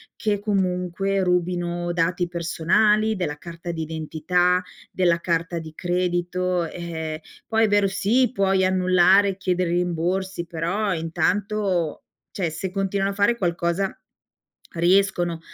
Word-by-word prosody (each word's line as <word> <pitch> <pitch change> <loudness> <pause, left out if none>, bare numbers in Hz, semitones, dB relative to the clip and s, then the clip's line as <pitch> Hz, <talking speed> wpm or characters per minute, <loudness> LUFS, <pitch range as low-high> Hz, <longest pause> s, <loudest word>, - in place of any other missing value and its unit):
che 210 -3 -1
comunque 195 -1 0
rubino 175 -1 -1
dati 175 +1 0
personali: 185 +6 +2
della 150 -6 -3
carta 170 +2 -7
d'identità, 165 +3 0 0.3
della 175 -2 +2
carta 170 0 -1
di 160 -1 -9
credito. 180 0 -1
Eh, 160 -2 -5 0.3
poi 225 0 +2
è - - +1
vero, 205 -1 +3
sì, 230 +7 +2
puoi 195 -3 +2
annullare, 185 +1 +4
chiedere 180 -2 0
rimborsi, 175 +1 -1
però 175 +5 -1
intanto 185 +1 -1 0.3
cioè 180 -6 -2
se 160 +5 -4
continuano 195 0 -1
a - - -6
fare 220 +4 +2
qualcosa, 175 +1 -1 0.8
riescono 175 -1 +2
180 Hz, 115 wpm, -23 LUFS, 170-195 Hz, 0.8 s, annullare